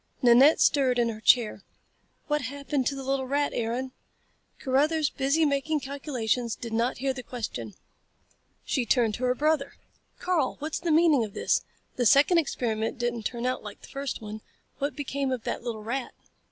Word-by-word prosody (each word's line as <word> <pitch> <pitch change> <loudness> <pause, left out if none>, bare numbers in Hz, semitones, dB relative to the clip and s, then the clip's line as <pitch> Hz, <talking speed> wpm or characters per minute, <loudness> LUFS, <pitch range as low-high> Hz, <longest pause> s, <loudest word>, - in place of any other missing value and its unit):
Nanette 250 +6 +7
stirred 265 -4 +3
in 235 -1 +2
her 220 -1 -6
chair. 220 -4 +4 0.6
"What 295 0 0
happened 280 +1 -2
to 280 - -1
the 270 - -6
little 265 0 -1
rat, 285 +2 0
Aaron?" 240 +3 -2 0.7
Carruthers, 295 +3 +1
busy 280 +4 +1
making 290 +2 0
calculations, 255 -4 -2
did 230 -1 -7
not 235 +3 0
hear 265 +1 -1
the 260 - -6
question. 205 - -6 0.9
She 260 - 0
turned 235 -2 +2
to 250 +4 -2
her 250 0 +2
brother. 300 0 +1 0.4
"Karl, 340 -8 0
what's 305 +2 -4
the 345 - -3
meaning 310 -5 +4
of 210 -2 -7
this? - - +1 0.4
The 245 -2 +3
second 295 - +5
experiment 225 -7 -2
didn't 240 -2 -1
turn 240 0 -5
out 255 0 -1
like 210 -1 -10
the - - -13
first 275 -4 -5
one. 215 +1 -7 0.4
What 285 +1 -2
became 280 -2 -2
of 250 -3 -3
that - - -3
little 230 -3 -5
rat?" 245 +3 -4
260 Hz, 175 wpm, -27 LUFS, 235-285 Hz, 0.9 s, Nanette